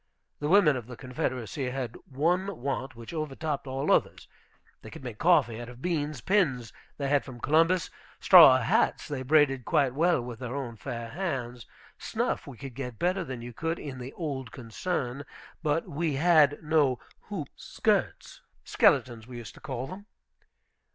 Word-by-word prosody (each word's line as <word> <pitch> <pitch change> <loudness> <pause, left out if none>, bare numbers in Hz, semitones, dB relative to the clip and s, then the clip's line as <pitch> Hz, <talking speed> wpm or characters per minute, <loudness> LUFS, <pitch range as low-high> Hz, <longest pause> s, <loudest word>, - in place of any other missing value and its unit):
The 145 - -2
women 175 -6 +5
of 120 -3 -6
the 125 -2 -9
Confederacy 130 -1 -3
had 125 -3 -4
one 175 +7 0
want, 135 0 -3
which 115 +6 -10
overtopped 155 -2 -3
all 135 +1 -1
others. - - +1 0.5
They - - -10
could - - -11
make - - -7
coffee 115 0 +3
out 120 - -8
of 125 0 -12
beans; 150 -3 -2
pins 145 - +1 0.2
they 140 - -2
had 145 0 +2
from 130 -3 -10
Columbus; 165 +6 +2 0.3
straw 165 -8 +9
hats 120 -3 +1
they 145 -3 -4
braided 135 -2 +3
quite 135 +1 +2
well 170 +4 +3
with 120 -1 -7
their 125 0 -5
own 125 -5 -4
fair 115 0 -6
hands; 125 -7 -4 0.3
snuff - - -2
we 135 -4 -9
could 135 0 -8
get 125 -3 -6
better 185 - 0
than 130 -6 -7
you 120 0 -8
could 165 +6 -2
in 135 -3 -7
"the 125 +2 -7
old 135 -7 -5
concern." 130 +2 -4 0.4
But 155 +3 0
we 160 -2 -1
had 155 -1 +4
no 150 -5 +2 0.3
hoop - - -5
skirts, - - -1 0.2
skeletons, 120 -4 +2
we 125 -1 -8
used 120 -2 -9
to - - -15
call 130 -3 -4
them. 190 +7 -10
135 Hz, 170 wpm, -28 LUFS, 125-155 Hz, 0.5 s, straw